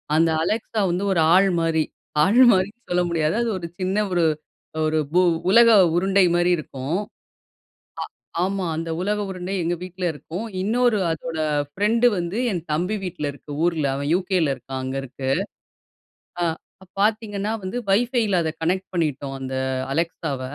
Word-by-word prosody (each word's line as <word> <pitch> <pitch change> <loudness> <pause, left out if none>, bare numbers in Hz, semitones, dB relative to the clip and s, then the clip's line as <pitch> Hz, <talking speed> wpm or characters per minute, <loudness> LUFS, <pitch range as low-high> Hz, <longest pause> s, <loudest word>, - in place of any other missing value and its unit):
அந்த 165 +1 +4
Alexa 220 +4 -2
வந்து 180 +3 -1
ஒரு 170 - +2
ஆள் 195 +1 +5
மாரி. 165 -1 +1 0.4
ஆள் 205 +9 +4
மாரின்னு 205 +5 -1
சொல்ல 180 0 +2
முடியாது. 160 0 0
அது 235 - 0
ஒரு 170 - -5
சின்ன 190 +3 +1
ஒரு 175 -2 +3 0.6
ஒரு 155 0 +1
பூ 175 - +4 0.3
உலக 230 +3 +7 0.3
உருண்டை 190 +2 +3
மாரி 175 +1 +2
இருக்கும். 145 0 -4 1.4
ஆ - - +2
ஆமா. 190 0 -1
அந்த 165 +1 -4
உலக 210 +2 0
உருண்டை, 185 0 -5
எங்க 175 +1 0
வீட்ல 185 0 -7
இருக்கும். 170 +7 -6 0.2
இன்னொரு, 230 +1 +2
அதோட 160 0 -4 0.3
ஃப்ரெண்ட் 215 +8 +2
வந்து, 175 +3 -3
என் 175 -4 -2
தம்பி 180 +7 0
வீட்ல 175 -4 -4
இருக்கு, 145 +1 -13
ஊர்ல. 165 -4 +1
அவன் 140 +1 -3
UKல 185 -3 0
இருக்கான்! 130 +1 -7
அங்க 130 +1 -4
இருக்கு. 130 0 -5 1.1
ஆ, - - +2 0.6
பாத்தீங்கன்னா 210 -1 0
வந்து, 185 +6 -4
வைஃபைல, 220 -2 +2
அத 160 - -1
கனெக்ட் 185 +4 0
பண்ணிட்டோம், 145 -5 -2
அந்த 130 0 -5 0.4
Alexaவ. 160 -4 -2
180 Hz, 150 wpm, -23 LUFS, 160-200 Hz, 1.4 s, உலக